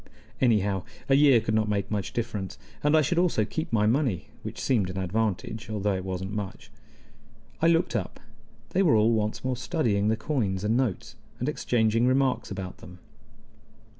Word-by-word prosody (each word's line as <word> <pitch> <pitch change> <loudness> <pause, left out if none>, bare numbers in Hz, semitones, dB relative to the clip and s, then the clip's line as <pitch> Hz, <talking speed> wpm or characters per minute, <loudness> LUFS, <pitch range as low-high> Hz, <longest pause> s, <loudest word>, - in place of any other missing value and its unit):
Anyhow, 105 -6 +2 0.3
a - - +5
year 140 -3 +6
could 110 0 -2
not 110 -1 +1
make 100 -1 -1
much 100 -2 -2
difference, 105 -5 -4 0.3
and 150 +2 +4
I 155 - +4
should 170 +5 +1
also 170 -12 +2
keep 160 +9 -4
my 105 -2 +3
money, 115 - +1
which - - -7
seemed 110 -8 +1
an 90 - -6
advantage, 110 +4 -2
though 105 -1 -1
it 95 -1 -3
wasn't 95 +1 -4
much. 100 -2 -6 0.9
I 165 - +4
looked 165 -3 +2
up: 100 -6 -3 0.5
they 190 - +2
were 165 -10 +4
all 110 +2 +4
once 105 -1 -1
more 130 0 0
studying 120 - 0
the 110 +1 +2
coins 110 -8 -1
and 110 +2 +1
notes, 125 -1 -1 0.2
and 125 - -3
exchanging 115 -5 +1
remarks 130 0 +1
about 95 -2 -6
them. 90 0 -12
110 Hz, 175 wpm, -27 LUFS, 100-130 Hz, 0.9 s, year